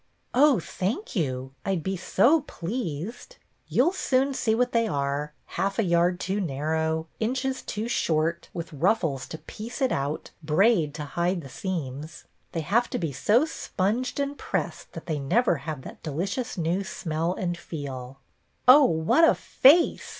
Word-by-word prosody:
" - - -44
Oh, 275 -2 +5
thank 210 - -3
you. 130 -6 -2
I 195 - 0
'd 165 - -4
be 190 +2 -1
so 240 - +3
pleased." 210 - -5 0.3
"You'll 345 - +3
soon 270 -5 +1
see 220 -4 +1
what 250 +1 +1
they 230 -1 +2
are, 140 -2 -1
— - - -42
half 195 0 0
a 225 - +3
yard 175 0 +2
too 195 +4 -1
narrow, 160 +1 -1
inches 260 +3 -1
too 215 +2 -4
short, 165 -6 0
with 165 -1 -6
ruffles 160 -4 +1
to 160 - -6
piece 220 +8 -8
it 260 -3 +2
out, 140 +3 -2
braid 160 -1 +3
to 150 - -4
hide 175 +4 -1
the 135 - -10
seams. 155 -2 -5 0.3
They 165 - -2
have 230 +10 +1
to - - -2
be 165 -4 -2
so 210 - +3
sponged 245 - -2
and 280 0 -1
pressed - - -4
that - - -8
they 155 -3 -2
never 175 - +2
have 145 -4 -5
that - - -10
delicious 190 - -3
new 175 +3 0
smell 165 -1 -2
and 175 -1 -2
feel." 135 -6 -7 0.3
" - - -43
Oh, 275 +3 +9
what 160 - +3
a 330 - +6
face 315 +6 +4
180 Hz, 170 wpm, -26 LUFS, 155-235 Hz, 0.3 s, Oh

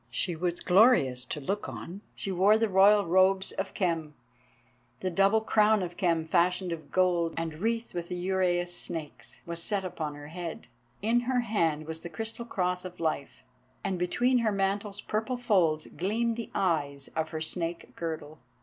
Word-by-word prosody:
She 175 -3 -1
was 175 +1 -2
glorious 180 - +4
to 150 - -4
look 195 +9 -3
on. 190 +4 -8
She 195 - -4
wore 195 +4 +5
the 225 0 +2
royal 200 +2 +6
robes 190 +2 +3
of 195 0 -4
Khem, 165 -5 -1 0.8
the 185 - -2
double 195 +4 +4
crown 215 -2 +3
of 175 -1 -5
Khem 165 -3 +1
fashioned 180 +2 +2
of 165 -2 -6
gold, 175 -3 +2
and 165 -2 -3
wreathed 230 +3 -1
with 175 -1 -4
the 180 - -4
uraeus 180 -1 0
snakes, 165 -4 -7
was 170 0 -5
set 200 +1 -1
upon 160 -5 -4
her 145 0 -10
head; 170 -3 -6 0.4
in 230 +3 +3
her 250 -1 +2
hand 165 -9 0
was 160 +1 -6
the 170 - -7
crystal 225 +6 -5
cross 180 -5 -1
of 180 -1 -9
Life, 155 -4 -2 0.4
and 190 -3 -1
between 245 +8 +2
her 225 -2 +1
mantle's 200 +1 -1
purple 220 +4 -2
folds 180 -10 +2
gleamed 225 +5 -1
the 230 -1 -5
eyes 145 -7 0
of 160 0 -1
her 160 - -4
snake 165 +1 -3
girdle. 155 -2 -5
180 Hz, 175 wpm, -29 LUFS, 165-205 Hz, 0.8 s, royal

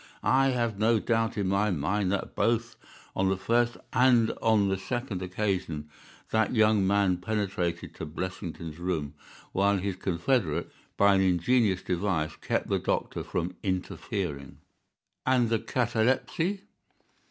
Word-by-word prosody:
I 135 +1 +4
have 120 -5 0
no 110 +1 +3
doubt 115 0 0
in 100 -2 0
my 100 +3 +2
mind 90 +4 0
that 100 - -2
both 115 +1 0 0.4
on 95 0 +2
the 95 - +1
first 120 +5 +1 0.2
and 120 -2 +4
on 110 -3 +3
the 95 0 0
second 115 -1 -3
occasion 90 -5 -2 0.4
that 110 +2 +1
young 105 -3 +4
man 100 -2 +3
penetrated 90 -4 -2
to - - -6
Blessington's 85 -1 -6
room, 80 -5 -2 0.4
while 100 +1 +2
his 95 0 -3
confederate, 95 - 0 0.3
by 100 0 +5
an 95 - +3
ingenious 95 +2 +2
device, 90 -4 -1
kept - - -1
the - - +1
doctor - - -2
from 90 +2 -3
interfering." 95 - -3 0.7
"And 125 -3 +3
the 115 -1 +2
catalepsy?" 125 - 0
100 Hz, 135 wpm, -28 LUFS, 90-115 Hz, 0.7 s, by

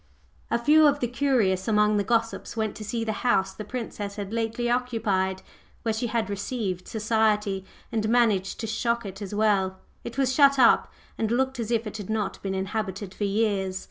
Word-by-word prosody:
A - - +2
few 300 +6 +5
of 290 0 +2
the 245 - 0
curious 235 -8 +1
among 210 -1 +3
the 205 - +1
gossips 230 +2 -1
went 220 -2 -1
to 215 - -7
see 225 +2 -2
the 220 - -1
house 195 -6 +2
the 215 - -7
Princess 210 -3 -5
had 205 0 -5
lately 230 +1 -1
occupied, 220 -6 0 0.4
where 225 - 0
she 225 +2 -2
had 225 -2 -1
"received" 200 -2 -3
society 210 -3 +1 0.3
and 215 -2 0
managed 220 -5 +2
to - - -2
shock 235 +1 -1
it 195 +1 -7
as 200 0 -5
well. 200 -3 +2 0.3
It - - -7
was 265 -1 +2
shut 275 0 +5
up, 255 - +5 0.3
and 220 - 0
looked 265 +2 0
as 230 -2 -3
if 230 -1 +1
it 215 0 -5
had 205 -2 -7
not 210 -3 -2
been 190 -1 -3
inhabited 195 0 -3
for 205 - -2
years. 200 -2 0
220 Hz, 195 wpm, -26 LUFS, 200-235 Hz, 0.4 s, few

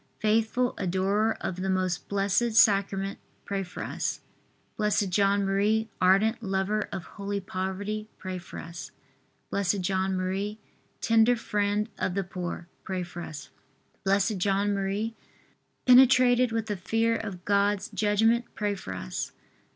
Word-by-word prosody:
faithful 225 +3 +1
adorer 195 +4 +1
of 185 - -3
the 190 +1 -2
Most 185 -2 -1
Blessed 200 +4 +1
Sacrament, 200 -2 +3 0.3
pray 200 -1 -2
for 180 -2 -6
us. - - -3 0.6
B. 210 0 +2
J. 200 -1 +1
M., 200 +2 +2
ardent 205 +5 +4
lover 200 +1 -1
of 185 - -4
holy 200 +2 -4
poverty, 195 +3 -4
pray 185 -1 -5
for 175 - -10
us. 170 +1 -7 0.6
B. 200 - +1
J. 190 0 0
M., 190 +2 -1 0.4
tender 230 +1 +4
friend 210 -1 0
of 180 - -1
the 195 - 0
poor, 175 -2 -5 0.2
pray 185 -1 -3
for 175 0 -8
us. 150 -4 -8 0.5
B. 195 0 +2 0.2
J. 190 +2 0
M., 200 +2 0 0.7
penetrated 255 -1 +6
with 225 -1 -1
the 210 -2 -3
fear 225 +5 +1
of 195 -6 -6
God's 200 0 +2
judgment, 225 +3 +2
pray 205 -1 0
for 95 - -6
us. 60 -9 -4
200 Hz, 135 wpm, -27 LUFS, 190-215 Hz, 0.7 s, penetrated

